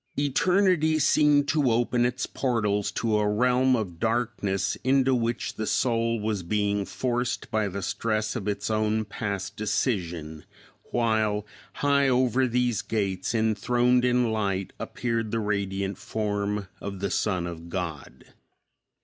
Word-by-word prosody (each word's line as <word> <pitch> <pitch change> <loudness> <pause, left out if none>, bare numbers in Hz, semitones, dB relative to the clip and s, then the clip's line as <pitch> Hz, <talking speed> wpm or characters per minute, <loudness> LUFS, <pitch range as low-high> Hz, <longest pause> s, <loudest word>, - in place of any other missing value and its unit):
Eternity 160 +3 +3
seemed 145 -1 +4
to 150 -5 +2
open 120 +1 +2
its 125 +1 -3
portals 105 -6 0
to 110 -2 0
a 105 0 +1
realm 125 +4 +3
of 95 -8 -4
darkness 110 -4 0
into 130 0 +3
which 120 -1 -1
the 110 - -4
soul 115 -2 +1
was 105 -2 -1
being 100 +2 0
forced 120 +6 -2
by 110 -1 +1
the 100 0 -5
stress 110 +3 -1
of 105 -4 -4
its 100 +1 -2
own 110 0 +1
past 100 -2 -4
decision, 85 - -2 0.4
while 110 -3 0 0.4
high 140 -1 +4
over 130 0 +2
these 120 -1 +1
gates 100 -1 -2
enthroned 120 +3 +2
in 125 -2 +2
light 100 -3 -1
appeared 115 -2 -2
the 115 - -1
radiant 100 -2 -2
form 105 -2 -2
of 100 -1 -5
the 100 -1 -2
Son 90 -5 0
of 85 -1 -7
God. 85 -5 -5
110 Hz, 135 wpm, -26 LUFS, 100-125 Hz, 0.4 s, seemed